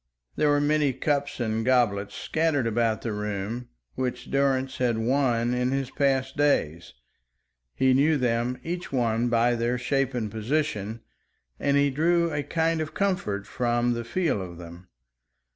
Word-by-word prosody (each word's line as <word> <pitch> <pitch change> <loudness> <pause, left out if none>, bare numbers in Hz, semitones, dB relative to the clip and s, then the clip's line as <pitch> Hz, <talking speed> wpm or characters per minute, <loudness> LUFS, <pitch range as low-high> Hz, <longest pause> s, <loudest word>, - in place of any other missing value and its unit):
There 150 - +2
were 145 0 +3
many 145 -1 +2
cups 140 +2 -1
and 110 -1 -1
goblets 110 -5 +1
scattered 155 -5 0
about 115 -1 0
the 115 - -2
room, 105 +3 -4 0.2
which 130 -1 -4
Durrance 135 -1 +1
had 120 -3 +1
won 120 0 +1
in 125 0 0
his 135 -1 -2
past 135 -1 0
days. 85 - 0 0.8
He 130 0 +3
knew 145 +4 +3
them 120 0 0
each 175 +1 -5
one 120 -2 +1
by 120 +1 +3
their 120 +1 0
shape 135 +1 0
and 110 -4 -2
position, 110 -2 -2 0.6
and 140 0 +2
he 140 0 +3
drew 170 +3 +2
a 145 - 0
kind 160 +2 0
of 155 - -5
comfort 145 - -1
from 120 0 0
the 120 0 -3
feel 150 - -1
of 90 -2 -8
them. 85 +1 -11
125 Hz, 155 wpm, -26 LUFS, 115-145 Hz, 0.8 s, were